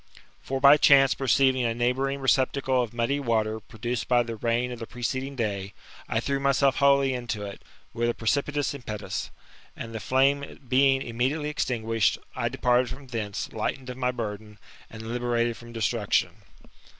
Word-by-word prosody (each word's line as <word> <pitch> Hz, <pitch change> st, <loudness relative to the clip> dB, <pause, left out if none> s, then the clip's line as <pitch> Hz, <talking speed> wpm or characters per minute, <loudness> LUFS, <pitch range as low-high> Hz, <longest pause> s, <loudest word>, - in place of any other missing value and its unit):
For 135 Hz, 0 st, -3 dB
by 140 Hz, +2 st, +8 dB
chance 135 Hz, -3 st, +6 dB
perceiving 130 Hz, 0 st, +2 dB
a 115 Hz, -1 st, 0 dB
neighbouring 135 Hz, +3 st, 0 dB
receptacle 130 Hz, 0 st, +2 dB
of 120 Hz, -3 st, -3 dB
muddy 120 Hz, +4 st, 0 dB
water 110 Hz, -4 st, 0 dB
produced 120 Hz, +3 st, -5 dB
by 120 Hz, -1 st, +4 dB
the 115 Hz, -1 st, -5 dB
rain 120 Hz, +3 st, -1 dB
of 120 Hz, -, -7 dB
the 115 Hz, -, -6 dB
preceding 130 Hz, +3 st, -3 dB
day, 100 Hz, -5 st, -3 dB, 0.3 s
I 110 Hz, -, +1 dB
threw 140 Hz, +3 st, -1 dB
myself 140 Hz, 0 st, +2 dB
wholly 140 Hz, -1 st, +4 dB
into 120 Hz, -4 st, -4 dB
it^ 100 Hz, -1 st, -7 dB, 0.3 s
with 120 Hz, +1 st, 0 dB
a 120 Hz, -, -1 dB
precipitous 145 Hz, +5 st, 0 dB
impetus; 110 Hz, -6 st, -5 dB, 0.5 s
and 115 Hz, 0 st, -7 dB
the 110 Hz, -, -4 dB
flame 135 Hz, +4 st, +1 dB
bein^ 135 Hz, +1 st, +3 dB
immediately 130 Hz, +6 st, -1 dB
extinguished, 115 Hz, -6 st, 0 dB, 0.2 s
I -, -, -1 dB
departed 125 Hz, 0 st, +2 dB
from 135 Hz, +3 st, -9 dB
thence, 105 Hz, -5 st, -4 dB
lightened 125 Hz, +4 st, -3 dB
df 125 Hz, -, -5 dB
my 125 Hz, -1 st, 0 dB
burden, 105 Hz, -3 st, -6 dB, 0.3 s
and 110 Hz, 0 st, -9 dB
liberated 120 Hz, 0 st, 0 dB
from 120 Hz, 0 st, -12 dB
destruction. 110 Hz, -5 st, 0 dB
125 Hz, 160 wpm, -26 LUFS, 115-135 Hz, 0.5 s, by